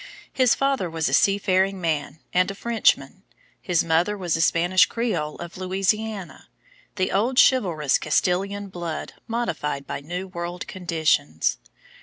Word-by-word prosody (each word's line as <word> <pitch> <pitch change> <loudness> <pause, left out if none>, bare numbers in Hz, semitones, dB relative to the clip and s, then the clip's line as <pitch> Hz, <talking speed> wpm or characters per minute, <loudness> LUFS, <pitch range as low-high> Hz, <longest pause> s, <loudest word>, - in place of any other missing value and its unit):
His 255 -2 +4
father 275 -10 0
was 160 -1 -1
a - - -4
sea 200 0 +4
faring 190 -1 +1
man 155 -3 -2
and 180 +1 +3
a 195 - -5
Frenchman; 235 +2 +1 0.4
his 180 -4 +1
mother 170 +5 +1
was 175 -4 -1
a 165 - 0
Spanish 175 +3 +4
Creole 220 -11 -2
of 175 0 -9
Louisiana 195 +2 -2 0.5
the 185 -2 0
old 235 +6 +1
chivalrous 170 - +3
Castilian 195 +6 0
blood 170 -3 -5
modified 185 -12 -2
by - - -4
new 180 +6 -5
world 175 0 -5
conditions. 160 - 0
185 Hz, 140 wpm, -24 LUFS, 165-205 Hz, 0.5 s, His